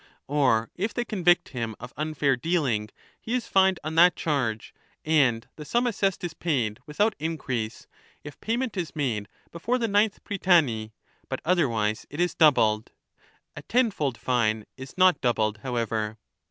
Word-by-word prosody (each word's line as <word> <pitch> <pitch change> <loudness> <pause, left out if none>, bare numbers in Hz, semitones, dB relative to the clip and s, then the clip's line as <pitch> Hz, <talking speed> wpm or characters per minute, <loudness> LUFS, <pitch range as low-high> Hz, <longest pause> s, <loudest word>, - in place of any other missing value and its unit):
Or 130 -6 +2
if 205 +4 -3
they 240 - -1
convict 175 -5 +2
him 115 -5 -4
of 125 +1 -9
unfair 150 -2 0
dealing, 125 -7 0 0.3
he 230 - -2
is 250 - -1
fined 190 -2 +3
on 155 +1 -4
that 175 +2 +6
charge, 125 -8 -2 0.3
and 135 -7 +2
the 150 - -7
sum 240 - 0
assessed 195 -6 0
is 175 -2 -3
paid 130 -11 -1
without 205 +9 +1
increase, 130 -8 -3 0.4
if 150 -2 -11
pay 225 +2 -1
ment 255 -4 -3
is 175 -4 -4
made 115 -9 -1 0.2
before 220 +9 -1
the 235 -2 -1
ninth 205 0 +1
prytany, 160 - +2 0.4
but - - -3
otherwise 115 -12 +1
it 145 - -8
is 175 0 +1
doubled. 110 -9 +3 0.6
A - - -7
ten 245 -1 +2
fold 140 - -2
fine 110 -4 0
is 130 +4 -11
not 185 -4 +4
doubled, 110 -4 0
however. 115 -3 -2
150 Hz, 160 wpm, -26 LUFS, 115-180 Hz, 0.6 s, that